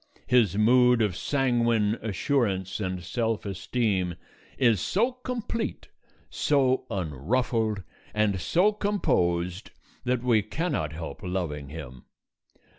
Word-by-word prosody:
His 115 -7 +3
mood 125 +2 +5
of 105 -5 +1
sanguine 120 -5 +1
assurance 100 -3 0
and 95 -3 -3
self 110 +3 -1
esteem 95 -2 -1 0.4
is 115 -8 +3
so 230 - +1
complete, 245 -2 -4 0.4
so 130 -3 +1
unruffled, 105 - -1 0.3
and 105 -4 +1
so 180 - +3
composed 90 - 0 0.3
that 125 -1 0
we 120 -4 +4
cannot 110 - -2
help 80 +1 -7
loving 85 -7 -3
him. 65 -5 -9
110 Hz, 105 wpm, -27 LUFS, 90-125 Hz, 0.4 s, mood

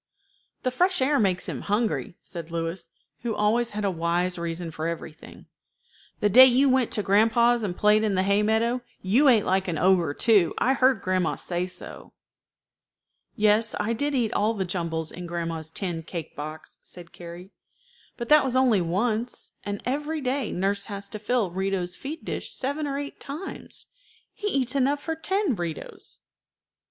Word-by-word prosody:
"The 255 - +1
fresh 360 +7 +2
air 275 +2 +2
makes 190 -4 +1
him - - -4
hungry," 210 -3 -1
said 170 -2 -8
Louis, 165 +1 -4 0.3
who 230 -2 -2
always 230 +3 +2
had 210 -1 -3
a 195 - +2
wise 175 +1 0
reason 170 0 -4
for 155 +1 -3
everything. 165 -2 -8 0.8
"The 210 - +4
day 255 +6 +9
you 260 +2 +4
went 260 -2 +3
to 210 - 0
grandpa's, 230 +4 +4
and 190 -5 -3
played 210 +1 +4
in 210 -3 +1
the 185 - +2
hay 200 +1 +3
meadow, 225 +3 +1 0.2
you 235 +10 +4
ate 230 -6 +5
like 190 +1 +1
an 170 -3 -1
ogre 175 -4 +3
too. 210 -7 +3
I 260 - +3
heard 260 -4 +3
grandma 185 -2 +1
say 175 0 -3
so." 185 - -9 1.2
"Yes, 215 +1 +3
I 210 +2 0
did 285 +5 -1
eat 235 -4 +1
all 220 +2 +1
the 190 -2 -1
jumbles 165 -3 -3
in 180 0 -7
grandma's 165 -2 -4
tin 170 -1 -4
cake 165 0 -7
box," 155 +2 -8
said 175 -2 -11
Carrie; 175 +3 -10 0.7
"but 235 - -5
that 300 0 +7
was 260 -2 -2
only 250 -7 +4
once, 215 +7 -2
and 205 0 -5
every 295 +4 -2
day 265 -2 -1
nurse 200 +2 -1
has 200 -2 -6
to 215 - -6
fill 215 -3 0
Rito's 190 -1 -2
feed 305 +4 -7
dish - - -4
seven 285 +3 -2
or 275 -1 -2
eight 285 0 -6
times. 305 +8 -7 0.5
He 415 - -4
eats 260 - 0
enough 280 +1 +1
for 325 - -2
ten 380 - 0
Ritos." 170 -4 -6
210 Hz, 175 wpm, -26 LUFS, 175-255 Hz, 1.2 s, day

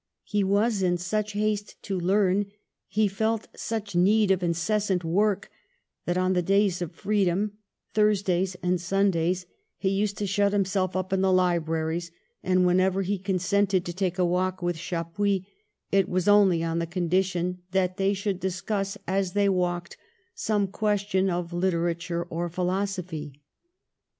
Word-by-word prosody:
He 205 -2 0
was 200 +2 +2
in 175 -1 +2
such 210 +4 -2
haste 210 0 -2
to 195 -3 -2
learn, 195 +2 +2 0.4
he 215 0 +2
felt 220 +3 -1
such 215 -4 -4
need 200 +3 +4
of 190 -1 +2
in 170 -1 +1
cessant 190 +1 0
work, 200 +4 +1 0.6
that 175 +1 +1
on 185 0 +2
the 180 - +2
days 195 0 +2
of 175 - -3
freedom, 205 +1 0 0.3
Thursdays 195 -4 +2
and 180 -1 +1
Sundays, 180 -1 +1 0.3
he 190 - 0
used 200 +1 0
to 205 - -2
shut 200 +1 +1
him 200 -1 +2
self 185 -1 -1
up 185 +1 -2
in 190 - +2
the 190 0 +3
libraries, 170 -2 +1 0.3
and, 185 -1 +2
whenever 185 +2 +2
he 195 +1 -1
con 195 0 -1
sented 190 +1 +1
to 175 - -5
take 185 -1 -1
a 180 - +3
walk 185 +1 0
with 175 0 0
Chappuis, 180 +3 -1 0.5
it 195 -1 +3
was 180 +1 0
only 195 -5 +5
on 165 0 -1
the 170 - -2
condition 180 +1 0
that 185 -1 0
they 195 +1 +2
should 195 -1 -2
discuss, 195 +2 -2
as 190 -1 -1
they 205 -1 +3
walked, 175 -2 -1 0.4
some 215 - 0
question 200 -1 0
of 175 -1 -3
literature 170 -1 -1
or 170 +1 -2
philosophy. 180 -5 -3
185 Hz, 160 wpm, -26 LUFS, 175-200 Hz, 0.6 s, only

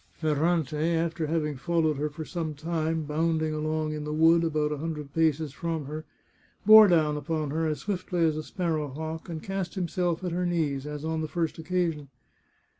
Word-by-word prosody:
Ferrante, 155 0 +1
after 165 -1 -1
having 150 -2 -1
followed 160 0 +1
her 150 +2 -1
for 155 +2 -7
some 160 -3 -4
time, 160 +1 -1
bounding 155 +1 0
along 155 0 -1
in 150 -1 -4
the 150 - -4
wood 165 +2 +5
about 155 -2 0
a 150 - -3
hundred 150 -3 -5
paces 160 -3 +1
from 165 -1 -3
her, 155 +3 -6 0.6
bore 215 0 +10
down 155 -4 +3
upon 155 -1 -2
her 160 +1 0
as 155 -1 -2
swiftly 185 -3 -2
as 155 -1 +2
a 155 - -2
sparrow 160 -2 -2
hawk 160 +5 -6
and 160 -2 -5
cast 195 -2 -3
himself 175 -1 -1
at 180 - -2
her 180 +2 -1
knees, 150 -5 -1
as 150 0 -5
on 160 0 -1
the 155 - -2
first 165 0 -2
occasion. 165 -3 -1
160 Hz, 190 wpm, -27 LUFS, 150-170 Hz, 0.6 s, bore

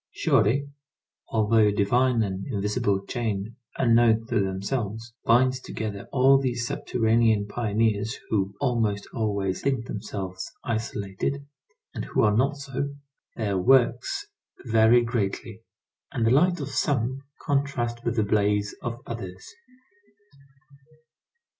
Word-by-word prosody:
Surely, 135 -1 +2 0.6
although 110 0 +3
a - - +3
divine 115 +4 +2
and 95 -1 -4
invisible 100 -3 -1
chain 110 -2 -3 0.2
unknown 115 -2 +4
to - - 0
themselves, 105 +4 -3
binds 130 +2 +4
together 105 -5 -5
all 135 +1 +5
these 125 -2 -1
subterranean 115 -3 +1
pioneers 110 0 0
who, 100 -2 0
almost 110 -5 0
always, 100 -4 -1
think 135 -4 0
themselves 95 -4 -5
isolated, 110 +4 -3 0.5
and - - -4
who - - +1
are 105 -1 +4
not 140 +5 +2
so, 140 0 -4 0.4
their 100 -4 -1
works 130 - +3 0.4
vary 115 +1 +5
greatly, 115 -1 -3 0.5
and 115 -3 0
the 115 - +3
light 175 +7 +4
of 140 -1 -4
some 130 -2 0 0.2
contrasts 130 -5 -1
with 120 0 -1
the 110 - +2
blaze 105 0 +1
of 120 -1 -4
others. 95 -6 -8
115 Hz, 115 wpm, -26 LUFS, 105-125 Hz, 0.6 s, all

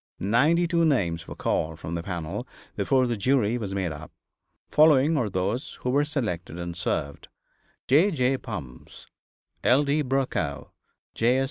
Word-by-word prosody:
Ninety 145 - +3
two 170 -1 +2
names 85 - +1
were - - -7
called 80 0 -1
from 80 0 -6
the 85 - -2
panel 85 -3 -5 0.3
before 130 -1 +2
the 120 -1 -1
jury 120 +1 +1
was 100 -3 -4
made 95 -4 -1
up. 75 0 -9 0.6
Following 150 0 +5
are 120 -8 0
those 100 +8 -2
who 125 - 0
were 145 +2 +3
selected 100 - -3
and 85 0 -5
served: 70 -4 -3 0.6
J. 155 +10 +5
J. 135 -6 +1
Bumfs, 80 - -9 0.6
L. 130 +4 +4
D. 145 +2 +1
Brokow, 130 - -2 0.4
J. 125 +3 +2
120 Hz, 150 wpm, -26 LUFS, 85-140 Hz, 0.6 s, Following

